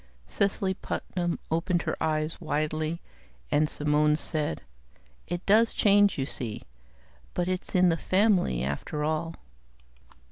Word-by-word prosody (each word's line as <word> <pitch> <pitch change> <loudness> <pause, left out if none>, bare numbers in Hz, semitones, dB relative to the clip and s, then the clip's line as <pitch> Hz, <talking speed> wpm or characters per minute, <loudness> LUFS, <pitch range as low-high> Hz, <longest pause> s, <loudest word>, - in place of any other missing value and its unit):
Cecily 195 - 0
Putnam 175 -2 -3
opened 170 +2 +1
her - - -1
eyes 155 +1 -1
widely, 155 +1 -1 0.5
and 150 +1 +3
Simone 150 0 +2
said, 155 - -2 0.7
"It 175 +1 -4
does 225 +3 +4
change, 205 -1 +4
you 135 - 0
see. 120 -5 -5 0.7
But 175 0 0
it's 185 +1 -3
in 180 -1 +5
the 165 - +1
family, 185 - +2
after 70 - -3
all." 160 +2 -1
165 Hz, 120 wpm, -27 LUFS, 150-185 Hz, 0.7 s, in